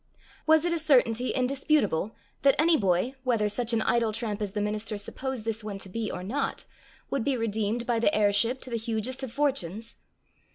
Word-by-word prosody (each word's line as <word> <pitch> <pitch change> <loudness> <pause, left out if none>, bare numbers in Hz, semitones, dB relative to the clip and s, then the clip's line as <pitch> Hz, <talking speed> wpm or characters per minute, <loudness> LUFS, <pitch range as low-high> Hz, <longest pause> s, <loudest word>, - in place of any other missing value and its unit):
Was 315 +1 +5
it 345 - +1
a 335 - 0
certainty 255 -5 +3
indisputable, 255 - +1 0.3
that 275 -1 +5
any 320 +2 +4
boy, 195 - +1
whether 230 -5 +2
such 230 +3 -1
an 225 -1 +1
idle 230 -2 +2
tramp 215 -1 -3
as 200 -2 -3
the 210 - -2
minister 210 +1 -2
supposed 255 +3 -4
this 225 -1 -1
one 205 -2 -5
to 195 - -8
be 220 +2 -3
or 180 - -5
not, 265 +9 -2 0.5
would 275 - 0
be 270 0 +1
redeemed 225 +1 -1
by 235 -2 +1
the 225 - +3
heirship 215 +5 +2
to 255 - -8
the 230 - 0
hugest 230 +3 -2
of 265 -3 -4
fortunes? 230 - -2
230 Hz, 195 wpm, -28 LUFS, 210-260 Hz, 0.5 s, Was